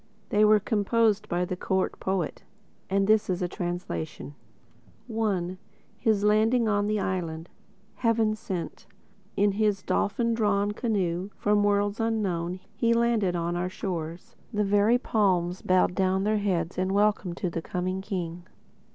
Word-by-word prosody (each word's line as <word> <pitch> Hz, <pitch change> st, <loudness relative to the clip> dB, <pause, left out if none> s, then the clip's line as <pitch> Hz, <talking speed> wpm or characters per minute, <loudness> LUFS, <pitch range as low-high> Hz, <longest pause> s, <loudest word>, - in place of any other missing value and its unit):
They 210 Hz, +1 st, +3 dB
were 215 Hz, 0 st, +6 dB
composed 215 Hz, +1 st, +1 dB
by 175 Hz, +1 st, 0 dB
the 180 Hz, -, -3 dB
Court 190 Hz, +1 st, -1 dB
Poet; 190 Hz, -4 st, -2 dB, 0.5 s
and 195 Hz, +1 st, +2 dB
this 215 Hz, 0 st, +3 dB
is 180 Hz, 0 st, -1 dB
a -, -, +1 dB
translation: 175 Hz, -4 st, -5 dB, 0.7 s
I 200 Hz, -6 st, -1 dB, 0.4 s
(His 210 Hz, -2 st, +2 dB
Landing 220 Hz, +3 st, +3 dB
on 205 Hz, -1 st, +1 dB
The 215 Hz, 0 st, 0 dB
Island) 170 Hz, -4 st, -3 dB, 0.5 s
Heaven 225 Hz, -2 st, +2 dB
sent, 185 Hz, -5 st, -6 dB, 0.5 s
In 205 Hz, +1 st, +4 dB
his 205 Hz, -1 st, 0 dB
dolphin 230 Hz, +3 st, 0 dB
drawn 205 Hz, -2 st, +1 dB
canoe 195 Hz, -5 st, -1 dB
From 205 Hz, 0 st, +2 dB
worlds 205 Hz, 0 st, +1 dB
unknown 185 Hz, -6 st, -1 dB
He 230 Hz, +2 st, +2 dB
landed 230 Hz, -6 st, +2 dB
on 170 Hz, 0 st, -1 dB
our 180 Hz, +1 st, -1 dB
shores. 170 Hz, -3 st, -5 dB, 0.2 s
The 210 Hz, -2 st, 0 dB
very 205 Hz, +4 st, +4 dB
palms 185 Hz, -7 st, +1 dB
Bowed 185 Hz, -1 st, +3 dB
down 190 Hz, 0 st, +1 dB
their 215 Hz, +1 st, +1 dB
heads 180 Hz, -4 st, -1 dB
In 185 Hz, +1 st, 0 dB
welcome 205 Hz, -4 st, +1 dB
to 180 Hz, -1 st, -3 dB
the 165 Hz, -, -3 dB
coming 185 Hz, +2 st, -3 dB
King. 180 Hz, -3 st, -5 dB
200 Hz, 145 wpm, -27 LUFS, 180-215 Hz, 0.7 s, were